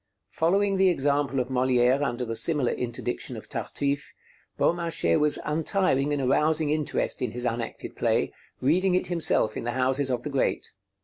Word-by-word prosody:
Following 195 +4 +1
the 190 0 +4
example 140 -3 0
of 125 0 -2
Molière 130 +1 +2
under 125 -3 -2
the 115 -1 -4
similar 130 +2 +2
interdiction 120 0 -4
of - - -10
'Tartuffe,' 140 0 -3 0.4
Beaumarchais 165 - +1
was 150 0 +3
untiring 150 -2 +1
in 145 - 0
arousing 150 +3 +2
interest 155 -1 -1
in 125 - 0
his 125 +1 -4
unacted 115 -1 -4
play, - - 0 0.3
reading 180 +7 +2
it 185 - +1
himself 135 -10 +3
in - - -4
the 120 0 -2
houses 130 +2 0
of 125 -2 -2
the 150 - -5
great. 135 - -1
140 Hz, 165 wpm, -26 LUFS, 125-160 Hz, 0.4 s, the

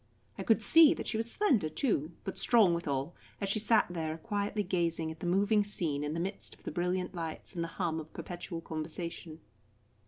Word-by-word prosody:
I - - -6
could 225 -1 +3
see 320 +7 +8
that - - -5
she 220 - -1
was 225 +1 0
slender, 245 - +2
too, 160 - 0
but 190 - -4
strong 220 -7 +4
withal, 150 -2 -2 0.3
as 200 - -2
she 205 - +2
sat 220 +1 +4
there 160 -2 -3
quietly 205 +3 -2
gazing 170 -3 -1
at 160 - -10
the 175 - -4
moving 205 +4 +3
scene 165 -8 -2
in 150 +1 -2
the - - -2
midst 190 +4 -4
of - - -26
the - - -4
brilliant 180 +1 -1
lights 165 0 -6
and 170 -2 -2
the - - -3
hum 165 -4 0
of 155 0 -9
perpetual 175 -1 -6
conversation. 160 0 -6
175 Hz, 200 wpm, -31 LUFS, 160-205 Hz, 0.3 s, see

